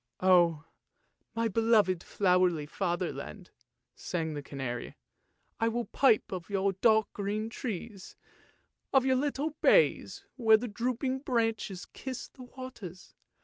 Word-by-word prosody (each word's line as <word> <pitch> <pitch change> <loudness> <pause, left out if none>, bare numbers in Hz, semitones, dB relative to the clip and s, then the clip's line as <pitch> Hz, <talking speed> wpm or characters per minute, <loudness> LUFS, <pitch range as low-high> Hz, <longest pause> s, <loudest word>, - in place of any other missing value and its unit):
" - - -59
" - - -56
Oh, 175 -4 +4 0.7
my 230 0 +1
beloved, 215 -4 +3
flowery 180 -5 +2
fatherland! 180 +3 -4 0.3
" 125 0 -55
sang 160 -3 -3
the 145 - -5
canary. 130 -4 -5 0.3
" - - -45
I 225 - +2
will 235 +1 -1
pipe 265 -6 +2
of 180 -2 -6
your 195 -1 +1
dark 220 +2 +3
green 210 +2 -3
trees, 215 -4 -6 0.8
of 265 -1 +4
your 260 -1 +3
little 290 +3 -1
bays, 400 -4 +3
where 220 -3 +6
the 245 +3 -5
drooping 250 +4 -2
branches 225 -7 -1
kiss 260 -2 -7
the 255 - -12
waters. 240 -9 -10
210 Hz, 140 wpm, -30 LUFS, 180-245 Hz, 0.8 s, where